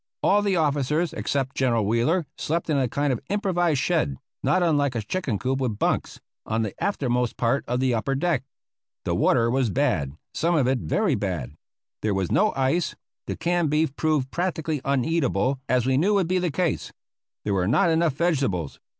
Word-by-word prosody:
All 205 +1 +4
the 200 -2 +1
officers 150 +1 +1
except 135 -1 -2
General 120 -5 +1
Wheeler 120 - +1
slept 165 +1 -2
in 145 - +2
a 130 - +1
kind 140 +3 0
of 120 - -3
improvised 175 -7 +1
shed, 70 - 0 0.2
not 185 - +2
unlike 145 -6 +2
a 115 - -1
chicken 130 - -2
coop 130 +5 -1
with 115 -5 -1
bunks, - - -1 0.2
on 110 +1 -1
the 105 - -3
aftermost 125 - 0
part 120 +4 +1
of 125 +1 0
the 130 -1 +2
upper 125 +4 0
deck. 155 -2 0 0.6
The - - 0
water 115 0 +3
was 130 -2 +1
bad 95 - 0 0.2
some 170 +1 +1
of 140 -6 +2
it 130 -1 +1
very 205 - +1
bad. 90 - -3 0.5
There 105 -2 0
was 95 -2 -1
no 215 +1 +3
ice. 135 +6 0 0.3
The - - -2
canned 175 -2 0
beef 150 -1 +1
proved 150 -5 0
practically 160 -5 -2
uneatable, 135 -3 +1
as 125 -1 +2
we 130 0 +2
knew 200 +8 +3
would 190 -4 +2
be 185 +1 +1
the 180 -1 0
case. 170 +1 -1 0.5
There 105 - 0
were 90 -2 +1
not 170 - +3
enough 165 -2 +2
vegetables. 135 - 0
140 Hz, 185 wpm, -25 LUFS, 120-170 Hz, 0.6 s, All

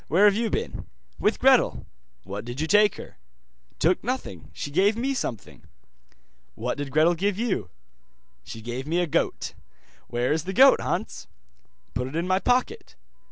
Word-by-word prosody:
Where 185 +7 +4
have 205 - +6
you 230 +1 0
been?' - - -4 0.3
'With - - +1
Gretel.' - - +3 0.4
'What 100 +3 -6
did 120 +3 -7
you 160 - 0
take 210 +3 +4
her?' - - -11 0.6
'Took 175 +3 +2
nothing, 205 - -4
she 145 - -6
gave 200 +7 +3
me 265 +4 -1
something.' 115 - -5 0.9
'What - - -3
did 145 -1 -3
Gretel 155 +5 +4
give 195 +3 -1
you?' 215 - -2 0.7
'She 115 - -9
gave 120 +4 -5
me 165 +3 0
a 175 - +2
goat.' 155 - -1 0.5
'Where 120 +2 -1
is 160 +1 -2
the 190 - -4
goat, 265 +6 +6
Hans?' - - -3 0.7
'Put 125 +1 -2
it 135 - -8
in 170 +2 -1
my 185 0 +2
pocket. 250 +4 -1
170 Hz, 165 wpm, -25 LUFS, 130-210 Hz, 0.9 s, have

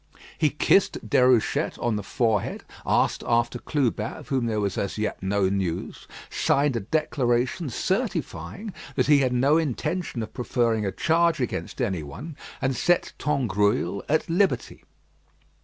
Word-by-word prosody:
He 150 - +2
kissed 170 +6 +2
Déruchette 125 -3 +3
on 120 -2 0
the 105 - -2
forehead, 110 -1 -1 0.2
asked - - +2
after 120 +1 +1
Clubin, 120 -8 -1
of - - -11
whom 130 -4 0
there 110 -2 0
was 100 -2 -1
as 100 - -2
yet 110 0 -2
no 95 0 +1
news, 95 -3 -3 0.2
signed 140 -1 +1
a - - +1
declaration 130 - 0
certifying 105 - -3 0.2
that 130 - +2
he 145 0 +5
had 130 -2 +2
no 135 +5 +3
intention 155 -2 -2
of - - -9
preferring 115 -4 0
a - - -1
charge 165 - +2
against 125 - -3
anyone, 95 - -4 0.3
and 130 0 +1
set 175 +8 +1
Tangrouille 105 - +1
at 155 +2 +2
liberty. 185 +4 0
125 Hz, 140 wpm, -25 LUFS, 105-150 Hz, 0.3 s, he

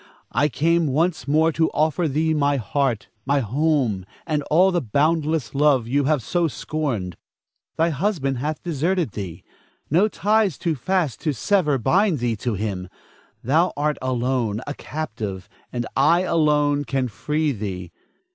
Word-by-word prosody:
I 145 - +2
came 165 +3 +2
once 160 +5 0
more 160 +3 +3
to 160 0 +1
offer 160 +3 +1
thee 155 +3 +1
my 145 -2 +2
heart, 130 -1 -1
my 140 +3 +2
home, 130 -4 0 0.2
and 155 -3 0
all 185 +5 +5
the 175 -2 +1
boundless 150 +1 0
love 140 -4 +3
you 140 +3 +1
have 145 -4 +1
so 175 +7 +1
scorned. 125 - -3 0.6
Thy 165 +1 +3
husband 140 - -1
hath 150 +3 -3
deserted 170 - 0
thee; 95 -5 -7 0.5
no 180 +7 +4
ties 210 -4 +1
too 170 - -1
fast 160 - -1
to 155 - 0
sever 150 - +2
bind 180 - +2
thee 120 -2 -1
to 115 +1 -2
him. 95 -3 -4 0.5
Thou 160 +9 +2
art 150 +1 0
alone, 125 -4 0
a 145 - -4
captive, 110 -13 -5 0.2
and 120 -1 -3
I 170 +1 +4
alone 150 -4 +2
can 135 -2 -1
free 150 +6 -1
thee. 95 -6 -5
145 Hz, 150 wpm, -23 LUFS, 125-160 Hz, 0.6 s, all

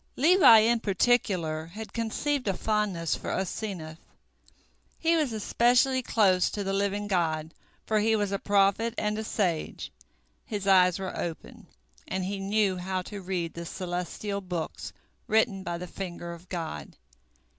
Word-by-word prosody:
Levi 305 -5 +7
in 230 +2 +3
particular 185 -7 +1
had 215 +6 -9
conceived 250 +4 -1
a 195 - +1
fondness 205 -7 0
for - - -6
Asenath. 180 -4 -4 1.0
He 330 +1 +2
was 305 -6 +1
especially 245 +4 +2
close 195 -7 +3
to 205 - -4
the 195 0 -2
Living 200 +1 0
God, 160 -4 -1 0.3
for 215 -1 +1
he 220 +1 +3
was 205 -2 0
a 200 - -1
prophet 205 +3 +2
and 210 0 -1
a - - -3
sage, 180 -7 -2 0.5
his 205 -4 -5
eyes 180 -2 +5
were 190 -1 -5
open, 165 -2 -6 0.4
and 185 0 -2
he 195 +1 -3
knew 195 -1 +1
how 185 +1 -3
to 205 +1 -8
read 180 -3 -3
the 170 - -6
celestial 180 +3 -4
books 180 -4 -5 0.4
written 220 -2 +2
by 175 -2 -4
the 180 - -6
finger 175 -2 -6
of 170 +2 -14
God. 160 - -5
195 Hz, 150 wpm, -28 LUFS, 180-220 Hz, 1.0 s, Levi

